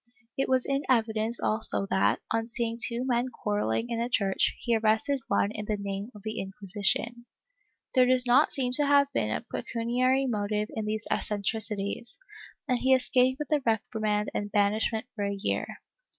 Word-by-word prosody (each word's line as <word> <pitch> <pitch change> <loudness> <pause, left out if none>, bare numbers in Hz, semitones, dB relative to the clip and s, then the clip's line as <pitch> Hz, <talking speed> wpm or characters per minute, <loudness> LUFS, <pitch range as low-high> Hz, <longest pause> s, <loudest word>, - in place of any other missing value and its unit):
It 270 - -1
was 260 -1 +2
in 275 0 0
evidence 225 -1 +1
also 215 -2 +2
that, 190 - +2
on 225 0 0
seeing 235 -1 -2
two 235 +1 -2
men 245 0 0
quarrelling 210 - -2
in 230 - -1
a 235 +1 -1
church, 195 -5 +1
he 235 -2 0
arrested 225 +6 +1
one 200 - +1
in 210 -1 -6
the 210 0 -1
name 200 +1 -5
of 205 - -13
the 215 0 -4
Inquisition. 205 +5 -1 0.7
There 255 -2 +5
does 255 0 +4
not 250 +5 +4
seem 255 -2 -1
to 295 -1 +1
have 280 -1 +4
been - - 0
a - - -3
pecuniary 250 +3 0
motive 210 -3 -1
in 220 - -3
these 215 0 -3
eccentricities, 210 +1 -2 0.5
and 250 -3 +1
he 265 +1 +4
escaped 255 0 +2
with 300 +1 -6
a 300 -2 +2
reprimand 215 -2 -1
and 205 0 -3
banishment 215 +2 +1
for 205 - -3
a 200 0 -2
year.' 200 - -2
225 Hz, 175 wpm, -28 LUFS, 210-250 Hz, 0.7 s, There